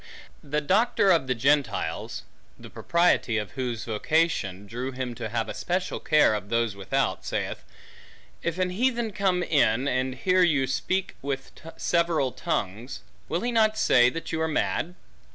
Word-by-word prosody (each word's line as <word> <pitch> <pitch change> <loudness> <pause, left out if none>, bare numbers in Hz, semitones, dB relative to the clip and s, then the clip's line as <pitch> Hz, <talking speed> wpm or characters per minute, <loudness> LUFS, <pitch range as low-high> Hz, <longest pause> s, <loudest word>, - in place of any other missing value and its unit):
The 150 +1 -1
doctor 195 +4 +3
of 165 -7 +3
the 125 - +1
Gentiles 135 -1 0 0.3
(the - - -12
propriety 170 -9 +2
of 105 -4 -3
whose 125 -4 -3
vocation, 110 - 0
drew 125 +5 -4
him 125 -1 -4
to 110 - -5
have 115 0 -1
a - - -5
special 180 +1 -2
care 150 -7 +4
of 100 -1 -4
those 115 -3 0
without) 100 -1 -1
saith, - - -3 0.8
if 170 0 -2
an 185 -1 0
heathen 235 +2 0
come 190 -3 +1
in, 135 -5 +2
and 130 -1 0
hear 185 +7 +2
you 150 -7 +3
speak 185 +8 -2
with 135 -1 -4 0.3
several 170 -6 +1
tongues, 120 - -3 0.3
will 170 - -1
he 245 - -1
not 220 -2 +3
say 125 - +5
that 165 +5 -6
you 160 -1 -1
are 160 - +1
mad? 160 +2 -1
145 Hz, 160 wpm, -26 LUFS, 120-180 Hz, 0.8 s, say